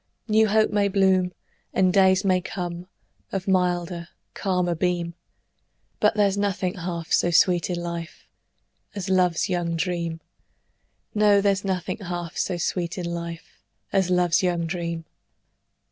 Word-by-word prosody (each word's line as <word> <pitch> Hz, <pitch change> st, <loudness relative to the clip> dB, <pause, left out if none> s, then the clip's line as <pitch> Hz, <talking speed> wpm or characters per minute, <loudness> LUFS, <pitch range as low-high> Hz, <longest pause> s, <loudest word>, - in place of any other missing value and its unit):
New 220 Hz, 0 st, +4 dB
hope 215 Hz, +1 st, +3 dB
may 205 Hz, -1 st, +2 dB
bloom, 190 Hz, -2 st, +3 dB, 0.4 s
And 185 Hz, -1 st, +3 dB
days 190 Hz, -1 st, +4 dB
may 185 Hz, -1 st, +3 dB
come, 175 Hz, -1 st, -5 dB, 0.4 s
Of 195 Hz, -1 st, -3 dB
milder, 175 Hz, -2 st, 0 dB, 0.3 s
calmer 180 Hz, -3 st, 0 dB
beam, 170 Hz, 0 st, -1 dB, 0.9 s
But -, -, +3 dB
there's 205 Hz, -1 st, +2 dB
nothing 195 Hz, -2 st, 0 dB
half 170 Hz, -3 st, -5 dB
so 175 Hz, -, +3 dB
sweet 175 Hz, 0 st, +3 dB
in 180 Hz, -, -1 dB
life 170 Hz, -1 st, -6 dB, 0.7 s
As 195 Hz, -2 st, -4 dB
love's 180 Hz, -3 st, +2 dB
young 175 Hz, -2 st, -1 dB
dream; 170 Hz, -1 st, -2 dB, 0.9 s
No, 210 Hz, -1 st, +5 dB
there's 200 Hz, -1 st, +1 dB
nothing 185 Hz, -1 st, -2 dB
half 175 Hz, -4 st, -5 dB
so 180 Hz, -, -1 dB
sweet 170 Hz, 0 st, -2 dB
in 180 Hz, -, -3 dB
life 170 Hz, 0 st, -6 dB, 0.3 s
As 190 Hz, -2 st, +2 dB
love's 180 Hz, -3 st, +3 dB
young 175 Hz, -2 st, 0 dB
dream. 170 Hz, -1 st, -4 dB
180 Hz, 135 wpm, -24 LUFS, 170-190 Hz, 0.9 s, No